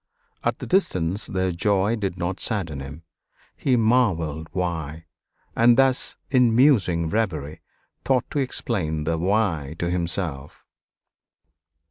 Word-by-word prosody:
At - - 0
the - - -7
distance 100 - 0
their 95 0 -1
joy 100 +4 +1
did 95 -5 -3
not 90 +1 -3
sadden 90 - -1
him 70 +4 -9 0.5
he 130 - +1
marveled 95 - +1
why; 85 -3 -3 0.5
and 120 0 +5
thus, 135 -1 +2
in 125 -4 +4
musing 105 - +3
reverie, 80 -7 -2 0.4
thought 130 -3 +1
to 145 - -1
explain 90 - -2
the 80 +1 -1
why 85 -6 0
to 85 0 -2
himself. 85 -5 -3
90 Hz, 120 wpm, -24 LUFS, 80-115 Hz, 0.5 s, and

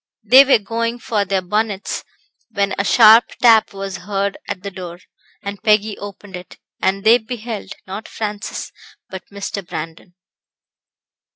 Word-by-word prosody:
They 255 +6 +8
were 275 -2 +5
going 230 +2 -3
for 215 -4 -1
their 190 -1 -1
bonnets, 210 +1 -2 0.5
when 200 -2 -1
a - - +2
sharp 225 +2 +7
tap 225 -3 +5
was 195 -1 -6
heard 195 +2 -2
at 185 - -5
the 200 - -5
door, 180 -2 -8 0.5
and 200 0 -6
Peggy 210 -1 +2
opened 200 -1 -9
it, 180 0 -11 0.2
and 195 +1 0
they 230 +3 +6
beheld, 225 -1 -6
not 195 +3 -7
Francis, 210 -1 -5 0.4
but 190 -1 -8
Mr. 200 0 -5
Brandon. 165 +1 -8
200 Hz, 145 wpm, -19 LUFS, 195-220 Hz, 0.5 s, They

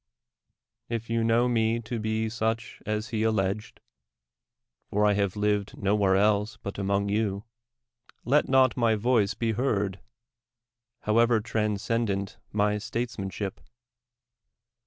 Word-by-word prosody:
If 115 -1 -4
you 115 0 +1
know 115 +2 +3
me 115 -1 +1
to 115 +1 -4
be 110 +1 -1
such 115 +1 -3
as 105 +3 -2
he 110 -3 -1
alleged 105 -2 -1 0.6
— - - -56
for 105 +1 +2
I 105 - +4
have 100 -2 0
lived 105 -1 0
no 100 +1 +1
where 100 -2 +3
else 105 +1 +2
but 100 0 -7
among 100 +1 0
you 100 -1 0 0.4
— 120 0 -32
let 150 - +4
not 130 -1 +4
my 115 -3 +3
voice 110 -2 +2
be 115 -1 0
heard, 105 -5 -1 1.0
however 115 +1 +3
transcendent 105 -1 -1
my 105 0 +1
statesmanship! 105 -3 -4
110 Hz, 130 wpm, -27 LUFS, 100-115 Hz, 1.0 s, I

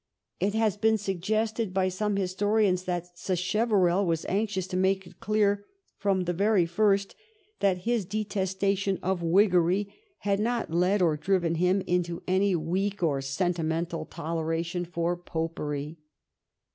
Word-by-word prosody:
It 200 +2 0
has 220 -3 +1
been 220 +1 +3
suggested 215 +2 -1
by 190 -1 +2
some 205 +2 -1
historians 195 0 +1
that 175 -1 -4
Sacheverell 190 0 +1
was 165 -3 -1
anxious 195 -2 -1
to 185 - -4
make 190 +1 +1
it - - -16
clear 205 -1 +1 0.3
from 195 -2 +1
the 175 0 -1
very 200 0 +3
first 200 +3 +1 0.5
that 190 -3 +1
his 235 -2 +1
detestation 195 -1 -1
of 185 -1 0
Whiggery 185 +2 +3 0.3
had 200 -1 +1
not 230 -5 -1
led 180 +3 +3
or 160 -3 +2
driven 175 0 +1
him 180 +3 +2
into 175 -1 -1
any 190 +1 +2
weak 185 +4 -1
or 140 -4 +1
sentimental 165 +2 -1
toleration 165 +2 -2
for 170 0 -1
Popery. 160 -3 -4
185 Hz, 135 wpm, -27 LUFS, 170-200 Hz, 0.5 s, been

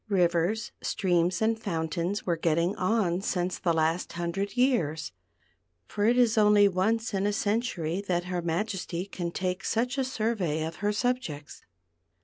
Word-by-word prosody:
rivers, 180 +2 +1
streams, 175 0 +1
and 220 0 +1
fountains 170 +1 -2
were 175 - +1
getting 170 +3 +1
on 185 -2 +1
since 180 -2 -1
the 175 - +1
last 165 +2 0
hundred 175 +6 -3
years, 175 - +1 0.7
for 205 0 -2
it 240 +2 +4
is 235 -2 +4
only 210 -1 +6
once 215 +5 0
in 195 +1 +1
a - - +2
century 205 -5 -1
that 175 -1 +1
her 180 -1 -3
Majesty 175 +1 -2
can 175 -3 -4
take 180 +1 -3
such 245 +4 0
a - - +2
survey 215 -11 -1
of 160 0 -6
her 205 +3 0
subjects. 210 - -2
185 Hz, 150 wpm, -28 LUFS, 170-215 Hz, 0.7 s, only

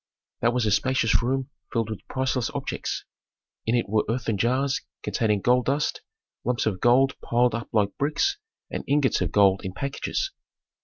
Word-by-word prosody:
That 115 - +3
was 125 -3 +2
a 105 - +2
spacious 115 +1 +3
room 130 +3 -1 0.2
filled 115 -2 -1
with 110 - -7
priceless 130 -2 -1
objects. - - -3 0.6
In 115 - +3
it 120 - +1
were 105 +1 +2
earthen 115 -2 0
jars 130 +6 +1 0.2
containing 105 0 +1
gold 125 +2 +3
dust, 140 +3 0 0.4
lumps 125 0 0
of 100 -5 -1
gold 130 +3 +5
piled 120 0 +2
up 115 +1 -4
like 105 -3 +1
bricks, 155 - +1 0.3
and - - -3
ingots 140 -1 +2
of - - 0
gold 100 -2 +4
in 95 - -4
packages. 140 - -2
120 Hz, 165 wpm, -25 LUFS, 110-130 Hz, 0.6 s, gold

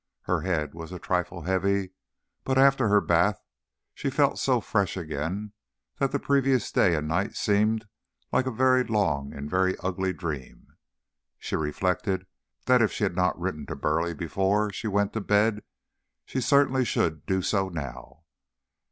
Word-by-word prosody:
Her 90 -3 0
head 80 -5 -1
was 80 +1 -8
a 90 - -5
trifle 90 -1 -2
heavy, 95 +1 0 0.5
but 130 0 0
after 135 -2 +5
her 105 0 +5
bath 85 +4 +2 0.5
she - - -3
felt - - +2
so - - +2
fresh 100 -2 -1
again 85 +5 -4 0.5
that 135 - +1
the 140 - +1
previous 135 -4 +1
day 90 -4 +3
and 75 0 -2
night 90 +6 -1
seemed 105 +1 +1 0.4
like 130 - +1
a - - 0
very 130 +2 +3
long 80 - 0
and 70 +1 -6
very 95 +3 +1
ugly 95 0 -2
dream. 80 -8 -7 0.6
She - - -4
reflected 95 +5 -1 0.4
that 125 -1 +5
if 110 - +3
she - - -3
had 95 -4 0
not 90 -1 +1
written 85 -5 -4
to - - -4
Burleigh 80 +2 0
before 95 +6 0
she 110 - -4
went 100 -1 0
to 110 - -2
bed 105 +1 +2 0.6
she 130 - -3
certainly 135 0 +3
should 80 -9 -1
do 95 -1 0
so 95 -1 0
now. 80 -1 -8
95 Hz, 160 wpm, -26 LUFS, 85-110 Hz, 0.6 s, after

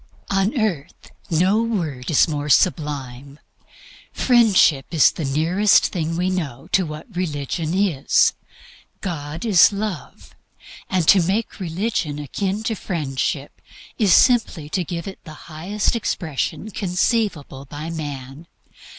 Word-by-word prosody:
On 195 +7 +1
earth 180 -11 -3 0.2
no 185 +7 +2
word 165 - -3
is 160 - +4
more 150 -2 -3
sublime. 140 -4 0 0.7
Friendship 215 - +3
is 160 -4 +4
the 160 - -6
nearest 170 +9 +3
thing 165 -1 -3
we 180 +1 0
know 155 -10 -4
to 185 -3 +2
what 155 +3 -9
religion 160 -1 -2
is. 185 -9 +2 0.7
God 160 0 -5
is 200 -5 +6
love. 200 -4 -6 0.6
And 180 -4 0
to 195 - +7
make 195 +8 -2
religion 175 -4 -2
akin 195 +8 -3
to 225 - -1
Friendship 145 -7 -3 0.4
is 205 -5 +3
simply 220 - +3
to 180 +3 -1
give 170 +2 -5
it 195 - -9
the 155 - -10 0.2
highest 195 +9 -1
expression 185 - -3
conceivable 180 - -1
by 150 +4 -7
man. 145 -1 -7
170 Hz, 125 wpm, -21 LUFS, 145-195 Hz, 0.7 s, to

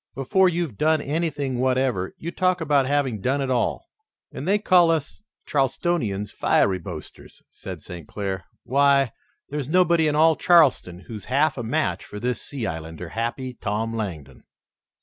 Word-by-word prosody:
Before 185 +8 +3
you've 165 - -3
done 155 +1 +3
anything 145 -4 -2
whatever, 130 -7 0
you 170 - -5
talk 185 0 +1
about 145 -4 +2
having 135 -7 0
done 135 +6 0
it 135 -1 -1
all." 125 - 0 0.5
"And 145 - -6
they 200 +2 +4
call 180 -5 +4
us 160 +1 -1 0.2
Charlestonians 135 - 0
fiery 95 -1 +2
boasters," - - -10
said - - -8
St. 85 -3 -9
Clair. 95 -2 -4 0.2
"Why, 140 -1 +3 0.4
there's 145 -2 -4
nobody 170 -2 +4
in 150 - +1
all 160 +1 +5
Charleston 145 - +3
who's 105 -1 -9
half 140 +3 +2
a 125 - -4
match 110 - -1
for 105 - -9
this 125 +2 -2
sea 135 -5 -5
islander, 80 +1 -6
Happy 120 +4 -3
Tom 110 0 -3
Langdon." 90 -10 -6
135 Hz, 155 wpm, -24 LUFS, 110-155 Hz, 0.5 s, all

